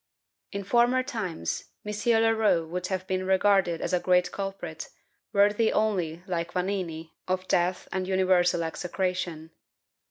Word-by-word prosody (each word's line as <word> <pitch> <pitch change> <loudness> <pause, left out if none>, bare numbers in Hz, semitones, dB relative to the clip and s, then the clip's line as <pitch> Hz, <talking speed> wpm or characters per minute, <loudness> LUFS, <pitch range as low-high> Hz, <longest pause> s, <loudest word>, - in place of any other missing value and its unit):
In 200 -1 -4
former 240 +5 +3
times, 195 - -3 0.2
M. 210 - -3 0.3
Leroux 220 -7 +2
would 180 +2 -3
have 185 -1 -3
been 185 0 -1
regarded 190 -2 +3
as - - -2
a 180 - +3
great 180 0 +2
culprit, 195 -5 -5 0.4
worthy 205 +2 +3
only 175 -6 0
(like 175 -2 -3
Vanini) 180 -4 -3 0.2
of 185 0 -1
death 180 +1 +1
and 185 -1 -2
universal 185 -2 +3
execration. 175 -1 -3
185 Hz, 130 wpm, -27 LUFS, 175-200 Hz, 0.4 s, former